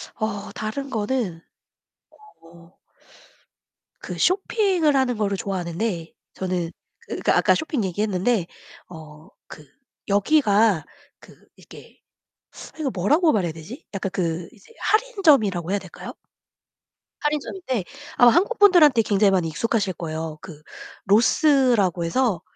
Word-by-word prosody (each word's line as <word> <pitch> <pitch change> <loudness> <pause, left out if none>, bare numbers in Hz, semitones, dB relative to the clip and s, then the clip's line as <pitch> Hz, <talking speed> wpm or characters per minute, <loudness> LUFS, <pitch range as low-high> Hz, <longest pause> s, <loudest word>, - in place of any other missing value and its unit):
어 205 -2 -4
다른 275 +6 -5
거는 215 -7 -2 1.0
어 170 +1 -18 1.3
그 - - -7
쇼핑을 370 -5 +1
하는 260 -2 +1
거를 200 -2 -1
좋아하는데 180 -1 -3 0.2
저는 180 -3 -3 0.5
그 - - +3
아까 - - +4
쇼핑 300 -8 -2
얘기했는데 195 +1 -1 0.4
어 155 -2 -13 0.2
그 150 -2 -15 0.4
여기가 205 - +2 0.3
그 - - -17 0.2
이렇게 - - -16 0.8
이거 305 -4 -2
뭐라고 300 - +2
말해야 180 - -1
되지? 165 - -11
약간 195 -1 -3
그 170 -2 -2
이제 240 - -20
할인점이라고 300 - +2
해야 200 - 0
될까요? - - -10 1.1
할인점인데 295 - -2 0.3
아마 245 -2 +7
한국분들한테 350 - +5
굉장히 205 -1 +2
많이 180 -3 +1
익숙하실 200 +3 -1
거예요. 160 -2 -5
그 155 -5 -12 0.4
로스라고 225 - +3
해서 235 +4 +1
어 170 - -15
205 Hz, 265 characters per minute, -23 LUFS, 175-270 Hz, 1.3 s, 아마